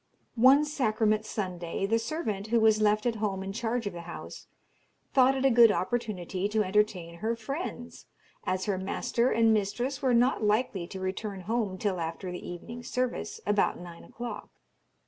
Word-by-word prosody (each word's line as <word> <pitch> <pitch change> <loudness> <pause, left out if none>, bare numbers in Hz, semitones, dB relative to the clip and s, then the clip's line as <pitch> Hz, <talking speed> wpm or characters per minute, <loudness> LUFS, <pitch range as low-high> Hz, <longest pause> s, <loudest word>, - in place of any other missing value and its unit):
One 275 +4 +7
Sacrament 215 -7 +1
Sunday 180 -2 -3
the 225 +3 +2
servant, 225 -6 -3
who 230 +1 +3
was 220 -1 +4
left 210 +1 +3
at 235 -2 0
home 200 -3 -2
in 195 0 -5
charge 230 +1 -2
of 205 - -3
the 170 - -7
house, 170 0 -9 0.7
thought 265 0 +5
it 265 - 0
a 270 - +5
good 230 -2 +7
opportunity 200 -3 -2
to 215 0 +2
entertain 185 -4 0
her 225 +4 -1
friends, 245 +1 -6 0.4
as 185 0 -1
her 195 -3 -1
master 235 +5 0
and 225 -2 +4
mistress 240 +6 -1
were 255 -3 +3
not 245 0 +3
likely 210 -4 +1
to 190 +1 -7
return 190 +1 -4
home 215 -1 -1
till 190 -2 -1
after 165 +3 -4
the 180 - -7
evening's 235 +8 -8
service, 250 -3 -2
about 205 0 +2
nine 175 -1 -10
o'clock. 240 0 -7
215 Hz, 170 wpm, -29 LUFS, 190-240 Hz, 0.7 s, One